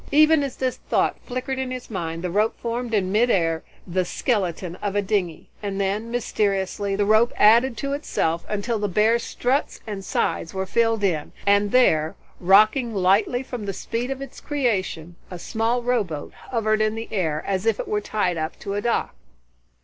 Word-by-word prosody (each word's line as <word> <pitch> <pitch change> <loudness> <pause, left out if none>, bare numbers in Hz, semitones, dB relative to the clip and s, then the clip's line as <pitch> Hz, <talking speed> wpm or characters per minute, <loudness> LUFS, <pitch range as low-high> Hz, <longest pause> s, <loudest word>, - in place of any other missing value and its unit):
Even 310 +1 +6
as 275 -3 -3
this 255 -1 -2
thought - - 0
flickered 255 +1 -3
in 260 -1 -2
his 255 -2 -7
mind, 165 -3 -4
the 180 - -2
rope 210 +4 +1
formed 235 0 -3
in 195 -4 +1
mid 230 +4 +3
air 165 -5 +1 0.2
the 185 +1 0
skeleton 180 -4 -1
of 205 -1 -3
a 205 - +3
dingy, 185 -5 -1
and 200 -1 -3
then, 200 +4 -1
mysteriously, 200 -4 -1
the 205 0 +1
rope 220 +3 +4
added 230 +3 +5
to 275 +4 -2
itself 170 - -1
until 215 +2 -1
the 205 - 0
bare 215 +5 +3
struts 255 +4 -1
and 205 -3 -5
sides 170 -1 -1
were 190 0 -1
filled 225 +2 +1
in 165 -6 0
and 200 0 +3
there, 160 -11 +3 0.2
rocking 215 +6 +4
lightly 200 +7 +2
from 245 -5 -6
the 195 - -2
speed 235 +6 -3
of 270 0 -4
its 275 - -11
creation, 190 - -2
a 180 - -7
small 225 +6 -1
row 245 -2 +2
boat 155 -6 -7 0.2
hovered 215 -3 +1
in 215 0 +1
the 225 0 -5
air, 160 -7 -1
as 195 +2 -1
if 225 - +2
it - - -3
were 210 0 0
tied 195 -5 -1
up 155 0 -3
to 200 - -5
a 205 - -1
dock. 235 +2 0
210 Hz, 190 wpm, -23 LUFS, 190-240 Hz, 0.2 s, Even